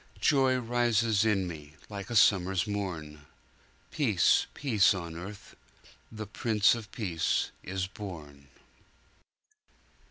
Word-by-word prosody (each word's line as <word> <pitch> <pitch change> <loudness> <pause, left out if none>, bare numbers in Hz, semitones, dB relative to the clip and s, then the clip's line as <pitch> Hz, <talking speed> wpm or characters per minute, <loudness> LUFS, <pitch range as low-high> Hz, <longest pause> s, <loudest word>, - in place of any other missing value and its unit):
Joy 135 -2 +3
rises 115 -3 +1
in 100 -4 +1
me, 75 -3 -9
like 100 0 -7
a 120 - -4
summer's 95 -3 +4
morn:Peace, 80 -8 -2
peace 110 -8 +3
on 85 -3 -6
earth, 100 +4 -9 0.6
the 110 -1 -6
Prince 105 0 +2
of 110 -4 -7
Peace 90 -8 -1
is 95 0 -3
born." 75 -8 -10
100 Hz, 100 wpm, -29 LUFS, 85-110 Hz, 0.6 s, summer's